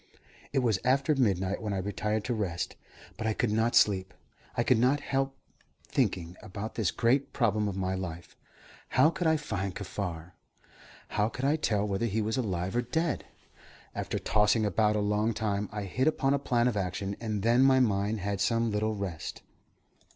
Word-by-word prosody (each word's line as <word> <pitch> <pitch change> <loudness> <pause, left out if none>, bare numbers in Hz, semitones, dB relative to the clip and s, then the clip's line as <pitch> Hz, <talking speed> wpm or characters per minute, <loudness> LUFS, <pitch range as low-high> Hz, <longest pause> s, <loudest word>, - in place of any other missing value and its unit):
It 135 -2 +1
was 110 -6 +2
after 135 +4 +3
midnight 100 -8 +1
when 105 -2 -2
I - - -1
retired 105 +2 -1
to 120 - -1
rest, 95 -6 -2 0.4
but 110 - -1
I 110 - +2
could 120 - 0
not 110 +2 +1
sleep. 95 -2 +3 0.4
I 120 - +3
could 120 -1 +3
not 130 +5 +3
help 135 -1 -1 0.5
thinking 85 0 -1
about 100 +3 -6
this 105 -6 0
great 125 +4 +1
problem 105 -4 +1
of 100 -1 -3
my 95 -1 -1
life. 85 -3 -6 0.5
How 135 +5 +4
could 170 0 -1
I 160 0 +4
find 100 -10 -3
Kaffar? 90 -4 -5 0.8
How 105 +1 +1
could 130 +3 -4
I 145 +2 +3
tell 105 -9 0
whether 100 +3 0
he 110 +1 -1
were 110 0 -1
alive 95 -6 -2
or 120 - +3
dead? 160 +6 -1 0.7
After - - -3
tossing 105 +1 +2
about 105 +1 +2
a 105 - +1
long 105 +2 +1
time, 105 -2 -1
I 105 0 -4
hit 125 +9 0
upon 140 -3 +2
a 140 - +2
plan 120 -3 +1
of 125 - 0
action, 95 +1 -2
and 110 -3 -3
then 120 +3 +4
my 135 0 +6
mind 105 -3 +1
had 100 0 -2
some 115 +1 +2
little 110 +1 0
rest. 95 -6 -5
105 Hz, 185 wpm, -29 LUFS, 100-120 Hz, 0.8 s, my